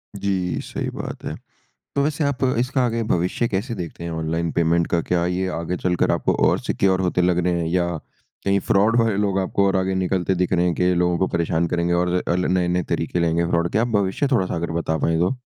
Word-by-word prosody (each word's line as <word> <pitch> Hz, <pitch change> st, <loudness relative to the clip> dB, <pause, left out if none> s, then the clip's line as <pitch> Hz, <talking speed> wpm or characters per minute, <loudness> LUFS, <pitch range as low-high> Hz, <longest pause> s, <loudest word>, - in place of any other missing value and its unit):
जी, 95 Hz, -2 st, -1 dB
सही -, -, -4 dB
बात -, -, -6 dB
है। -, -, -4 dB, 0.6 s
तो 140 Hz, -, +2 dB
वैसे 150 Hz, +2 st, 0 dB
आप 140 Hz, -2 st, -1 dB, 0.2 s
इसका 130 Hz, +2 st, 0 dB
आगे 115 Hz, -1 st, -1 dB
भविष्य 90 Hz, +7 st, 0 dB
कैसे 105 Hz, +5 st, -2 dB
देखते 85 Hz, -2 st, -7 dB
हैं 85 Hz, -, -4 dB
ऑनलाइन 80 Hz, +1 st, -2 dB
पेमेंट 85 Hz, 0 st, +2 dB
का 85 Hz, -, +1 dB
क्या 85 Hz, +1 st, 0 dB
ये 90 Hz, +1 st, -1 dB
आगे 85 Hz, +2 st, -3 dB
चलकर 90 Hz, -1 st, +1 dB
आपको -, -, +1 dB
और -, -, +2 dB
सिक्योर 95 Hz, -1 st, +1 dB
होते 90 Hz, -1 st, +1 dB
लग 90 Hz, 0 st, +2 dB
रहे 90 Hz, -, +2 dB
हैं? 85 Hz, -, -1 dB
या 85 Hz, +1 st, +1 dB, 0.6 s
कहीं 100 Hz, 0 st, +3 dB
फ्रॉड 105 Hz, +4 st, +3 dB
वाले 115 Hz, -3 st, +2 dB
लोग 100 Hz, -2 st, +1 dB
आपको 95 Hz, +1 st, +1 dB
और 95 Hz, -, +1 dB
आगे 95 Hz, 0 st, 0 dB
निकलते 95 Hz, 0 st, 0 dB
दिख 90 Hz, +1 st, 0 dB
रहे 90 Hz, 0 st, +2 dB
हैं, 90 Hz, -, +1 dB
के 90 Hz, 0 st, +2 dB
लोगों 90 Hz, 0 st, +2 dB
को 95 Hz, -, +1 dB
परेशान 85 Hz, 0 st, 0 dB
करेंगे 85 Hz, +1 st, 0 dB
और 90 Hz, 0 st, +1 dB
अ, 85 Hz, -, +2 dB
ल 90 Hz, 0 st, 0 dB
नए-नए 90 Hz, -1 st, +1 dB
तरीके 90 Hz, -, -1 dB
लाएँगे 85 Hz, 0 st, +1 dB
फ्रॉड 85 Hz, 0 st, +1 dB
के? -, -, -10 dB
क्या 110 Hz, -, +2 dB
आप 120 Hz, -, +1 dB
भविष्य 95 Hz, +8 st, 0 dB
थोड़ा-सा 95 Hz, -9 st, +1 dB
अगर 85 Hz, 0 st, -3 dB
बता 80 Hz, -1 st, -1 dB
पाए 80 Hz, +1 st, +1 dB
तो? 90 Hz, +10 st, +1 dB
90 Hz, 230 wpm, -22 LUFS, 85-100 Hz, 0.6 s, कहीं